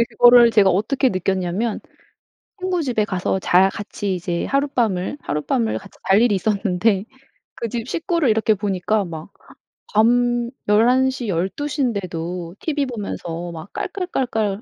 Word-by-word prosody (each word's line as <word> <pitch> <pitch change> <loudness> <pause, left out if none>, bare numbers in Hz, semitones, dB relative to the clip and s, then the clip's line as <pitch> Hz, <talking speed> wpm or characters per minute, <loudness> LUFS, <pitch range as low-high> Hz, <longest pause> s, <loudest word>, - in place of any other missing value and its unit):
예 - - +5
그거를 240 +1 +7
제가 205 -4 +5
어떻게 220 +9 +1
느꼈냐면 190 +2 -1 0.8
친구 365 -2 -1
집에 240 -7 0
가서 185 -1 -1
잘 190 0 +4
같이 205 -1 -4
이제 175 -1 -3
하룻밤을 250 -6 0
하룻밤을 115 -7 -1
같이 - - -16
잘 195 +2 +5
일이 240 -4 +3
있었는데 200 0 +1 0.5
그 235 - -4
집 235 +1 -4
식구를 335 - 0
이렇게 220 0 +3
보니까 205 +1 -1
막 165 +1 -8 0.6
밤 240 +2 +3 0.2
11:00 245 +3 +3
12:00 195 - -2
인데도 180 -6 -3
티브이 290 -4 -1
보면서 175 -7 -5
막 160 +3 -9
깔깔깔깔 240 - -2
210 Hz, 280 characters per minute, -21 LUFS, 185-245 Hz, 0.8 s, 그거를